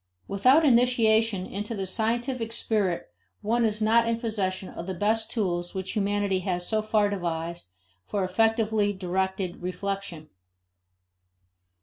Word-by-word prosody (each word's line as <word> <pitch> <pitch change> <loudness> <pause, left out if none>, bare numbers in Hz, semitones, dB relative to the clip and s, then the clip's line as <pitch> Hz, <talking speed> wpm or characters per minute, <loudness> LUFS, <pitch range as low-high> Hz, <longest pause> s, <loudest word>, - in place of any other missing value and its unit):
Without 255 +11 +4
initiation 225 -6 +3
into 210 +4 -5
the 195 -2 -3
scientific 230 +4 -1
spirit 200 - -1 0.3
one 235 +3 +1
is 215 -1 0
not 230 +2 +4
in 230 0 0
possession 195 -5 -2
of 170 - -8
the 190 - -3
best 220 +4 +1
tools 175 -6 -2
which 190 0 -3
humanity 205 -2 0
has 180 -1 -2
so 220 -1 +1
far 215 -1 +2
devised 170 - -3 0.4
for 200 -2 -1
effectively 215 +1 +2
directed 190 0 -2
reflection. 180 -3 -4
205 Hz, 125 wpm, -27 LUFS, 185-225 Hz, 0.4 s, Without